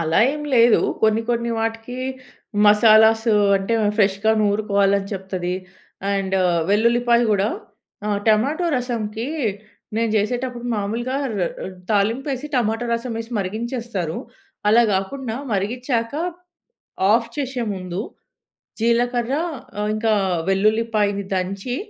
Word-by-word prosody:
అలా 160 0 +1
ఏం 300 0 -5
లేదు. 235 -1 +6 0.2
కొన్ని 220 +1 +3
కొన్ని 235 0 0
వాటికి 225 +2 -3 0.7
మసాలాసు 220 +2 +6 0.2
అంటే, 195 +4 -1 0.2
ఫ్రెష్‍గా 200 +1 +3
నూరుకోవాలని 200 -1 +1
చెప్తది. 185 -2 -3 0.6
అండ్, 195 -1 0 0.3
వెల్లుల్లిపాయ 235 +3 +3
కూడా 205 +1 +2 0.6
ఆహ్, 205 -1 +1
టమాటో 270 +11 +2
రసంకి, 235 -2 -2 0.7
నేను 230 0 +1
చేసేటప్పుడు 245 +3 -2
మామూలుగా 230 +6 -2 0.2
ర్ 210 - -4 0.3
ర్ 190 - -6 0.2
తాలింపు 220 +6 +1
వేసి 270 +2 -3
టమాటో 230 -1 0
రసం 235 +1 -2
వేసి 225 +1 -6
మరిగించేస్తారు. 215 -3 -3 0.5
అలా 230 +3 +6
కాకుండా 220 +5 -2 0.2
మరిగించాక, 230 +4 -1 1.0
ఆఫ్ 230 +1 +3
చేసే 265 -3 -2
ముందు, 185 0 -4 0.8
జీలకర్ర 240 +2 +1 0.5
ఆహ్, 210 - -1
ఇంకా 220 0 +1 0.4
వెల్లుల్లిపాయని 210 0 +1
దంచి... 195 +6 -2
220 Hz, 105 wpm, -21 LUFS, 200-240 Hz, 1.0 s, లేదు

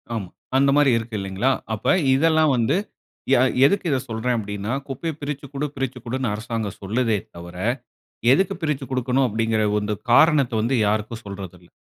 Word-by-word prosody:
ஆமா. 95 -6 -4 0.3
அந்த 140 +1 +4
மாரி 145 -3 +5
இருக்கு, 115 0 -5
இல்லைங்களா? 95 +7 0 0.2
அப்ப 110 - +2 0.2
இதெல்லாம் 160 +1 +3
வந்து 120 +6 +2 0.6
யா 130 - +6 0.3
எதுக்கு 195 +5 +2
இத 135 - +2
சொல்றேன் 115 +2 -1
அப்படின்னா, 105 +2 -4
குப்பைய 155 +5 -4
பிரிச்சு 145 0 -4
குடு, 140 +2 -2
பிரிச்சு 130 -2 -3
குடுன்னு 125 -1 -2
அரசாங்கம் 110 -2 -4
சொல்லுதே 110 +2 0 0.2
தவர, 85 +1 -10 0.8
"எதுக்கு 185 +7 +2
பிரிச்சுக் 145 -4 -2
கொடுக்கணும்?" 130 +1 +1
அப்படின்கிற 110 0 0
ஓ, - - 0
இந்த 105 0 -1 0.2
காரணத்த 150 -2 +5
வந்து 120 +4 0
யாருக்கும் 110 +2 -1
சொல்றதில்ல. 95 -3 -9
120 Hz, 155 wpm, -23 LUFS, 105-135 Hz, 0.8 s, யா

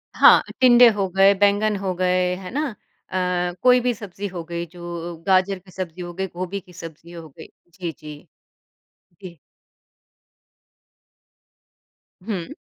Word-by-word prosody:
हाँ, - - +7 0.2
टिंडे 245 -1 +7
हो 200 -2 -1
गए, 195 +1 +6
बैंगन 205 +1 +3
हो 190 -1 -3
गए, 180 0 +1
है 185 0 -9
ना? 295 +5 -1 0.4
अ, 180 -1 -1
कोई 250 0 +6
भी 245 0 0
सब्ज़ी 205 -2 -7
हो 180 -3 -7
गई 170 +1 -5
जो 175 -1 -7
गाजर 190 0 +2
की 185 0 -19
सब्ज़ी 180 -1 -6
हो 175 0 -7
गई 190 +2 -3
गोभी 185 +3 -5
की 180 -1 -19
सब्ज़ी 165 -1 -11
हो 165 -2 -10
गई। 160 +3 -13 0.3
जी, 175 -3 -5
जी। 150 +1 -12 1.0
जी। 175 -3 -10 2.9
हुँ। 185 -6 -4
185 Hz, 140 wpm, -22 LUFS, 175-200 Hz, 2.9 s, हाँ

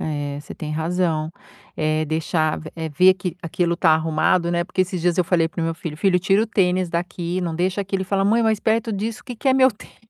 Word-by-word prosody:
É, 145 -2 -3
você - - -10
tem 155 - -6
razão, 160 0 -1 0.5
eh, 155 0 0
deixar 155 0 0
v 155 - -9
eh, 160 -1 -3
ver 180 +5 +5
que 180 -2 -5
aquilo 170 +1 -1
tá 165 - +3
arrumado, 160 +2 +1
né, 175 0 +1
porque 185 - 0
esses 185 -1 -4
dias 175 +1 +1
eu 180 - +3
falei 165 -2 +2
para 170 - -6
meu 165 0 -1
filho: 165 -3 -6
"Filho, 185 +2 +2
tira 195 +3 +3
o - - -1
tênis 185 -4 +1
daqui, 175 +1 -3
não 170 -3 -2
deixa 185 +4 0
aqui." 195 0 -2
Ele 190 - -2
fala: 195 +1 0
"Mãe, 225 +3 +3
mas 220 -2 +1
perto 225 0 0
disso, 225 +4 -4
que 245 - -7
que 270 - -1
é - - +5
meu 260 0 +6
tênis? 210 - -16
175 Hz, 245 wpm, -22 LUFS, 160-195 Hz, 0.5 s, meu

